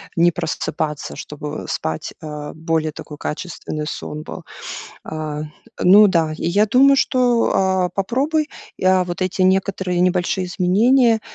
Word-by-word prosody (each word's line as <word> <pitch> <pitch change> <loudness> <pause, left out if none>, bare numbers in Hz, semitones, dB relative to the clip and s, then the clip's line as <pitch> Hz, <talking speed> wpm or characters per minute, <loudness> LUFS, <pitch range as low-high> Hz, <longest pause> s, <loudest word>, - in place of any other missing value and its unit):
не 175 +1 +4
просыпаться, 155 -2 -3
чтобы, 150 0 -6
э, - - -8
спать, 80 0 -3
а, 150 -2 -6
более 160 -1 -1
такой 150 -1 -9
качественный 155 -1 -5
сон 150 0 -5
был. - - -9 0.6
Э, 155 -1 -4 0.4
ну 205 +4 +8
да. 165 -4 +1
И - - -2
я 205 +5 +3
думаю, 270 +5 +5
что, 250 -3 +2
а, 190 -1 +2
попробуй, 285 +10 0 0.3
и, - - -8
а, 185 -1 +4
вот 175 +1 -5
эти 185 +1 -1
некоторые 185 -1 +1
небольшие 180 0 +1
изменения 225 +7 +3
180 Hz, 145 wpm, -20 LUFS, 155-200 Hz, 0.6 s, ну